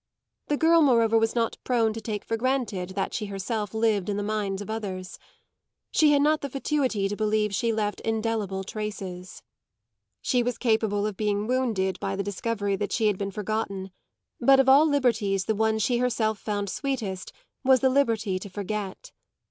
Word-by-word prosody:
The 295 Hz, -, 0 dB
girl 330 Hz, +2 st, +5 dB
moreover 230 Hz, -6 st, +4 dB
was 225 Hz, 0 st, +2 dB
not 230 Hz, -1 st, 0 dB
prone 230 Hz, -3 st, +1 dB
to 225 Hz, -, -6 dB
take 210 Hz, -2 st, -4 dB
for 225 Hz, -, -1 dB
granted 225 Hz, -7 st, -1 dB
that 195 Hz, -1 st, -2 dB
she 210 Hz, -, -3 dB
herself 200 Hz, +1 st, -3 dB
lived 220 Hz, -3 st, +1 dB
in 205 Hz, -, -1 dB
the 205 Hz, -, -2 dB
mind 205 Hz, -2 st, -2 dB
of 205 Hz, -, -7 dB
others 195 Hz, -4 st, -5 dB, 0.7 s
she 305 Hz, -2 st, +4 dB
had 285 Hz, -1 st, +4 dB
not 305 Hz, +1 st, +3 dB
the 280 Hz, -, -4 dB
fatuity 265 Hz, -6 st, 0 dB
to 205 Hz, -, -3 dB
believe 215 Hz, -1 st, 0 dB
she 230 Hz, +4 st, +1 dB
left 210 Hz, -2 st, -1 dB
indelible 220 Hz, -3 st, -1 dB
traces. 190 Hz, -3 st, -6 dB, 0.8 s
She 250 Hz, -, +2 dB
was 245 Hz, 0 st, -2 dB
capable 220 Hz, -3 st, +1 dB
of 210 Hz, -3 st, -3 dB
being 210 Hz, -1 st, 0 dB
wounded 225 Hz, -7 st, 0 dB
by 195 Hz, -, -2 dB
the 200 Hz, -, -2 dB
discovery 205 Hz, 0 st, -2 dB
that 205 Hz, 0 st, -3 dB
she 225 Hz, -, +1 dB
had 210 Hz, -3 st, +2 dB
been 200 Hz, -1 st, -2 dB
forgotten; 200 Hz, -2 st, -3 dB, 0.5 s
but 270 Hz, 0 st, +6 dB
of 270 Hz, -, +4 dB
all 280 Hz, +4 st, +7 dB
liberties 220 Hz, -9 st, +1 dB
the 220 Hz, -, +1 dB
one 220 Hz, +1 st, +1 dB
she 240 Hz, +3 st, +1 dB
herself 220 Hz, -4 st, 0 dB
found 205 Hz, -2 st, -3 dB
sweetest 225 Hz, -10 st, -3 dB, 0.3 s
was 260 Hz, -1 st, +5 dB
the 265 Hz, -, +4 dB
liberty 225 Hz, -8 st, +1 dB
to 200 Hz, -, -8 dB
forget. 200 Hz, 0 st, -5 dB
215 Hz, 180 wpm, -26 LUFS, 200-240 Hz, 0.8 s, all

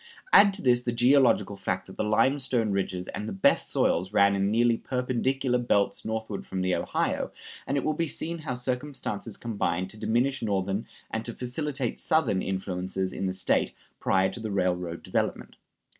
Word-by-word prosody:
Add 200 Hz, 0 st, +8 dB
to 200 Hz, -, -5 dB
this 120 Hz, -2 st, +4 dB
the 125 Hz, -, -1 dB
geological 120 Hz, -4 st, +4 dB
fact 95 Hz, -1 st, -2 dB
that 95 Hz, -, -12 dB
the -, -, -1 dB
limestone 120 Hz, 0 st, +2 dB
ridges 95 Hz, -2 st, -2 dB
and 105 Hz, +1 st, -5 dB
the -, -, -5 dB
best 95 Hz, -, +2 dB
soils 90 Hz, +3 st, +1 dB
ran 100 Hz, -1 st, +5 dB
in 100 Hz, 0 st, +1 dB
nearly 115 Hz, +2 st, +3 dB
perpendicular 125 Hz, +1 st, 0 dB
belts 100 Hz, -5 st, +1 dB
northward 110 Hz, -2 st, -4 dB
from 95 Hz, -1 st, -3 dB
the 95 Hz, 0 st, +1 dB
Ohio, -, -, -1 dB, 0.4 s
and 140 Hz, -, 0 dB
it 140 Hz, -, 0 dB
will 155 Hz, -, +1 dB
be 165 Hz, +2 st, -1 dB
seen 165 Hz, +3 st, -3 dB
how 145 Hz, -5 st, -3 dB
circumstances 125 Hz, -4 st, -3 dB
combined 95 Hz, -5 st, -2 dB
to 110 Hz, -, -9 dB
diminish 125 Hz, +6 st, +1 dB
Northern 100 Hz, -1 st, -1 dB, 0.2 s
and 110 Hz, -, -2 dB
to 120 Hz, -, -4 dB
facilitate 130 Hz, 0 st, -3 dB
Southern 155 Hz, -12 st, +2 dB
influences 95 Hz, 0 st, -3 dB
in 95 Hz, -, -2 dB
the 95 Hz, -, -1 dB
State 95 Hz, -, +1 dB, 0.3 s
prior 95 Hz, 0 st, +2 dB
to 105 Hz, -, -7 dB
the 110 Hz, -1 st, -4 dB
railroad 90 Hz, -3 st, -1 dB
development. -, -, -2 dB
110 Hz, 175 wpm, -27 LUFS, 95-130 Hz, 0.4 s, Add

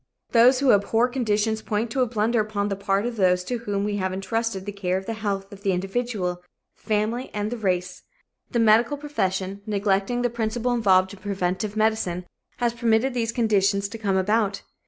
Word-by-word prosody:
Those 250 Hz, +3 st, +5 dB
abhorrent 230 Hz, +1 st, +3 dB
conditions 220 Hz, -3 st, 0 dB
point 220 Hz, +2 st, -2 dB
to 265 Hz, -, 0 dB
a 250 Hz, -, +3 dB
blunder 225 Hz, +1 st, +1 dB
upon 210 Hz, -1 st, -2 dB
the 195 Hz, -, -1 dB
part 200 Hz, +1 st, 0 dB
of 240 Hz, -1 st, -3 dB
those 180 Hz, -2 st, +3 dB
to 245 Hz, +5 st, -3 dB
whom 205 Hz, -3 st, -2 dB
we 205 Hz, 0 st, -1 dB
have 190 Hz, -1 st, -1 dB
entrusted 195 Hz, +1 st, -2 dB
the 205 Hz, -, -4 dB
care 190 Hz, -2 st, -1 dB
of 190 Hz, -, -6 dB
the 225 Hz, -, -3 dB
health 200 Hz, -3 st, -3 dB
of 200 Hz, -, -12 dB
the 195 Hz, -2 st, +1 dB
individual, 190 Hz, -2 st, -2 dB, 0.3 s
the -, -, -32 dB
family 220 Hz, +4 st, 0 dB
and 210 Hz, +1 st, -2 dB
the 245 Hz, -, -3 dB
race. 180 Hz, -4 st, -1 dB, 0.5 s
The -, -, -2 dB
medical 230 Hz, +5 st, +4 dB
profession, 195 Hz, -9 st, -2 dB
neglecting 205 Hz, +3 st, 0 dB
the 245 Hz, -, +1 dB
principle 235 Hz, +1 st, -1 dB
involved 190 Hz, -5 st, +3 dB
in 200 Hz, -, -12 dB
preventive 195 Hz, +1 st, -2 dB
medicine, 215 Hz, -5 st, 0 dB, 0.3 s
has 240 Hz, -1 st, 0 dB
permitted 235 Hz, +2 st, +1 dB
these 230 Hz, -2 st, -1 dB
conditions 200 Hz, -4 st, +2 dB
to 225 Hz, -, -8 dB
come 195 Hz, -3 st, 0 dB
about. 205 Hz, +1 st, +1 dB
210 Hz, 190 wpm, -24 LUFS, 195-230 Hz, 0.5 s, Those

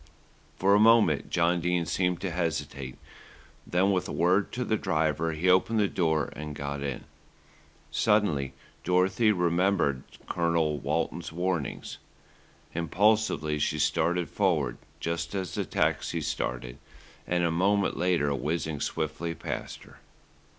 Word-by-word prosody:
For 100 Hz, +1 st, +3 dB
a 100 Hz, -, +6 dB
moment 110 Hz, -9 st, +4 dB
John 85 Hz, +1 st, +2 dB
Dene 90 Hz, 0 st, 0 dB
seemed 90 Hz, +3 st, 0 dB
to 95 Hz, -, -2 dB
hesitate, 70 Hz, -6 st, -3 dB, 0.7 s
then 95 Hz, +3 st, +2 dB
with 90 Hz, -2 st, 0 dB
a -, -, -5 dB
word 90 Hz, +4 st, +2 dB
to 125 Hz, +1 st, -2 dB
the 110 Hz, -, +1 dB
driver 80 Hz, -3 st, 0 dB
he 80 Hz, +4 st, -1 dB
opened 95 Hz, +5 st, +4 dB
the 105 Hz, -, +3 dB
door 80 Hz, -6 st, 0 dB
and 75 Hz, 0 st, -6 dB
got 70 Hz, 0 st, -4 dB
in. 70 Hz, -1 st, -4 dB, 0.9 s
Suddenly 85 Hz, -12 st, +1 dB, 0.3 s
Dorothy 95 Hz, +5 st, +3 dB
remembered 90 Hz, -6 st, +1 dB, 0.3 s
Colonel 85 Hz, -3 st, +1 dB
Walton's -, -, -2 dB
warning. 90 Hz, -3 st, -2 dB, 0.9 s
Impulsively 85 Hz, -3 st, +1 dB
she -, -, 0 dB
started 90 Hz, 0 st, +1 dB
forward, 80 Hz, -11 st, 0 dB, 0.2 s
just 85 Hz, +4 st, -3 dB
as 95 Hz, -2 st, -3 dB
the -, -, -2 dB
taxi -, -, 0 dB
started -, -, -3 dB, 0.5 s
and 90 Hz, 0 st, +1 dB
a 85 Hz, -, +2 dB
moment 100 Hz, +4 st, +2 dB
later 85 Hz, -5 st, +1 dB
whizzed 75 Hz, +1 st, -2 dB
swiftly 85 Hz, 0 st, -2 dB
past -, -, -6 dB
her. -, -, -17 dB
85 Hz, 130 wpm, -28 LUFS, 75-95 Hz, 0.9 s, a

